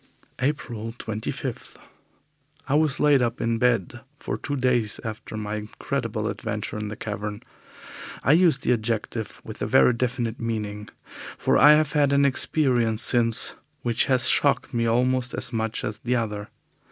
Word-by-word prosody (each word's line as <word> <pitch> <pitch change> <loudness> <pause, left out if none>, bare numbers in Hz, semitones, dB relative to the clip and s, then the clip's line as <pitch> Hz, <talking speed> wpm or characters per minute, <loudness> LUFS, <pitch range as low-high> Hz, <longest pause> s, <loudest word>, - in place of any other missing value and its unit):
April 120 -5 -3
25. 110 -2 -5 0.9
I 135 - -1
was 150 -1 +2
laid 145 -3 +4
up 120 0 -1
in 115 0 -1
bed 120 -1 0 0.2
for - - -4
two 145 - -4
days 125 -5 0
after 110 0 -7
my 105 0 -4
incredible 110 +1 -4
adventure 105 -2 -4
in 105 - -4
the 105 - -6
cavern. 105 -1 -6 0.8
I - - +3
use 170 +1 +4
the - - +1
adjective 110 -1 -3
with - - -10
a - - -1
very 125 - +5
definite 120 -1 -2
meaning, 105 -2 -4 0.5
for - - +1
I 150 - +8
have 155 -1 +2
had 145 -2 +2
an 140 0 +4
experience 125 -5 +3
since 115 -2 +4 0.3
which 120 -2 +1
has 130 -3 +4
shocked 140 -1 +2
me 115 -1 0
almost 125 +1 +1
as - - -3
much 110 0 -2
as 105 0 -4
the 125 +1 -1
other. 105 -3 -3
115 Hz, 155 wpm, -24 LUFS, 110-130 Hz, 0.9 s, I